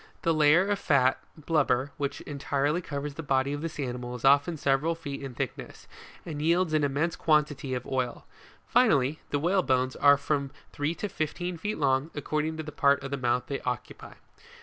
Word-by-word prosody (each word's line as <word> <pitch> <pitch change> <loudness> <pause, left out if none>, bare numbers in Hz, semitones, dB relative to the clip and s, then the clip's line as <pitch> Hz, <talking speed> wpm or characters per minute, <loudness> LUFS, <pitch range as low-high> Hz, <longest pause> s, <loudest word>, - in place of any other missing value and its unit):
The 165 - +3
layer 155 +5 +5
of 205 -1 0
fat 130 -6 +3 0.2
(blubber) 145 -4 +1
which 145 0 -3
entirely 145 +3 -1
covers 145 -2 -5
the 165 - -6
body 135 -1 0
of 145 - -4
this 160 -1 -5
animal 125 -2 -4
is 125 - -5
often 145 +4 +4
several 140 +4 +1
feet 140 -4 -6
in 135 -3 -7
thickness, - - -6 0.4
and 150 -3 -5
yields 170 +1 +2
an 155 -1 +2
immense 145 +4 0
quantity 150 -4 +1
of 125 - -5
oil; 130 -2 -2 0.4
finally, 155 - +3
the 145 - 0
whalebones 140 -6 +1
are 145 0 +6
from 140 -1 -1 0.2
three 145 +3 -2
to 205 - -3
fifteen 175 +1 -3
feet 210 +6 -3
long, 135 +1 +1
according 155 +2 -2
to 160 - -4
the 150 - -7
part 140 -1 +2
of 135 - -6
the - - 0
mouth 125 -1 +1
they 140 - -3
occupy. 125 -2 -5
145 Hz, 185 wpm, -28 LUFS, 135-160 Hz, 0.4 s, are